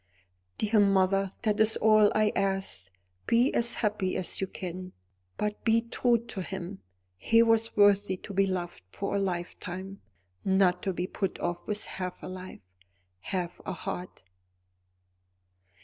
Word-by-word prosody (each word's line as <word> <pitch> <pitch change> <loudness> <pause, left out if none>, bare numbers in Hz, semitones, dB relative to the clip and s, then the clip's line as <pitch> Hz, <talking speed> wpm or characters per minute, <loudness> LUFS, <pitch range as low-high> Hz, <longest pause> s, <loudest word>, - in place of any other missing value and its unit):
"Dear 215 0 +2
mother, 195 -1 +3
that 215 -2 +1
is 220 +1 +4
all 215 -1 +5
I 215 -1 +3
ask. 195 - -1 0.4
Be 240 +3 +3
as 235 0 +3
happy 205 -3 -1
as 185 - -1
you 195 - 0
can; 185 0 -7 0.4
but 210 0 -2
be 225 0 +4
true 235 +1 +2
to 200 -4 -5
him. 190 +1 -6 0.4
He 230 - +4
was 225 -1 +2
worthy 205 -2 +4
to 200 - -9
be 195 0 +3
loved 175 -2 -3
for 200 - -3
a - - +2
lifetime; 185 +1 -4 0.4
not 190 -2 +3
to 195 - -1
be 175 +1 -2
put 195 0 -3
off 175 0 -3
with 210 -1 -1
half 185 -1 -6
a - - -5
life, 185 0 -8 0.6
half 175 - -4
a 190 - -4
heart." 180 +1 -6
195 Hz, 150 wpm, -29 LUFS, 185-210 Hz, 0.6 s, all